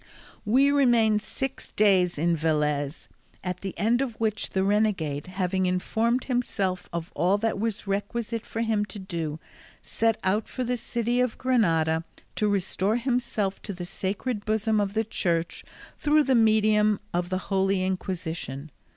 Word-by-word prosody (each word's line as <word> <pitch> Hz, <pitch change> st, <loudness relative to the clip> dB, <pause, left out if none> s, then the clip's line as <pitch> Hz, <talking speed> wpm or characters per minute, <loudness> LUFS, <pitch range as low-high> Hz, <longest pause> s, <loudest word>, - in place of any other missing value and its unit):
We 265 Hz, +6 st, +4 dB
remained 235 Hz, -6 st, +4 dB
six 270 Hz, +4 st, -5 dB
days 190 Hz, -5 st, +3 dB
in 170 Hz, +3 st, +2 dB
Velez, 150 Hz, -2 st, -1 dB, 0.4 s
at 180 Hz, -1 st, -3 dB
the 195 Hz, -1 st, -6 dB
end 230 Hz, +4 st, +2 dB
of 245 Hz, -5 st, -3 dB
which 220 Hz, -1 st, -1 dB
the 190 Hz, -, 0 dB
renegade, 190 Hz, -8 st, +1 dB
having 185 Hz, 0 st, 0 dB
informed 225 Hz, +7 st, 0 dB
himself 200 Hz, -7 st, -1 dB
of 170 Hz, 0 st, -4 dB
all 185 Hz, +4 st, +2 dB
that 225 Hz, -1 st, -1 dB
was 220 Hz, -1 st, -2 dB
requisite 210 Hz, +3 st, -2 dB
for 225 Hz, -, -4 dB
him 220 Hz, -2 st, +1 dB
to 210 Hz, -, -8 dB
do, 165 Hz, -5 st, -4 dB, 0.4 s
set 225 Hz, -1 st, +1 dB
out 205 Hz, +3 st, 0 dB
for 255 Hz, -, -3 dB
the 250 Hz, 0 st, 0 dB
city 240 Hz, +1 st, 0 dB
of 250 Hz, -3 st, 0 dB
Granada 165 Hz, -11 st, +2 dB, 0.3 s
to 210 Hz, -, +2 dB
restore 200 Hz, +1 st, 0 dB
himself 240 Hz, -5 st, -1 dB
to 205 Hz, -, -5 dB
the 175 Hz, -1 st, -6 dB
sacred 205 Hz, +5 st, -3 dB
bosom 215 Hz, 0 st, +1 dB
of 200 Hz, 0 st, -2 dB
the 220 Hz, -, +2 dB
Church 170 Hz, -5 st, -1 dB, 0.4 s
through 300 Hz, 0 st, +4 dB
the 270 Hz, -, +2 dB
medium 215 Hz, -2 st, +4 dB
of 175 Hz, 0 st, -1 dB
the 185 Hz, -, 0 dB, 0.2 s
Holy 190 Hz, 0 st, +2 dB
Inquisition. 165 Hz, -6 st, -4 dB
205 Hz, 155 wpm, -26 LUFS, 180-225 Hz, 0.4 s, We